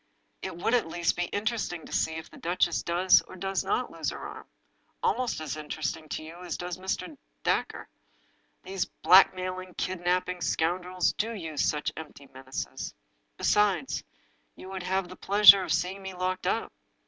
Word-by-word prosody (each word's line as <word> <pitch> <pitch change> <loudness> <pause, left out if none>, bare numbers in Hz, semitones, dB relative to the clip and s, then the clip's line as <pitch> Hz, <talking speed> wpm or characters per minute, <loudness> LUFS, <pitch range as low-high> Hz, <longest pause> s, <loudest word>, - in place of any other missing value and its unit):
It - - -5
would 205 +6 0
at 245 -8 +3
least 170 +1 0
be 175 - 0
interesting 205 -5 -2
to - - -12
see 160 - 0
if 160 0 -6
the - - -15
duchess 175 0 +1
does 180 +2 +4
or - - -11
does 195 0 -1
not 425 - -1
lose - - -2
her - - -6
arm - - -8 0.3
— - - -42
^almost 250 -7 +1
as 155 -1 -4
interesting 155 +1 -4
to - - -4
you 170 +3 -10
as 175 -3 -4
to 175 - -5
Mr. 185 - -4 0.3
Dacre. - - 0 0.8
Those 190 -1 -2
blackmailing, 185 -1 +3
kidnaping 180 0 -1
scoundrels 180 +3 0
do 225 +2 -2
use 160 -7 -2
such 150 -1 0
empty 150 -3 -10
menaces. 130 0 -6 0.4
Besides, 210 +5 +2 0.5
you 185 - -10
would 190 -1 -4
have 185 +1 -1
the 185 - -10
pleasure 200 0 +8
of 185 - -3
seeing 180 +4 0
me 190 -1 -7
locked 185 0 -2
up. 225 +4 -1
180 Hz, 170 wpm, -28 LUFS, 170-190 Hz, 0.8 s, pleasure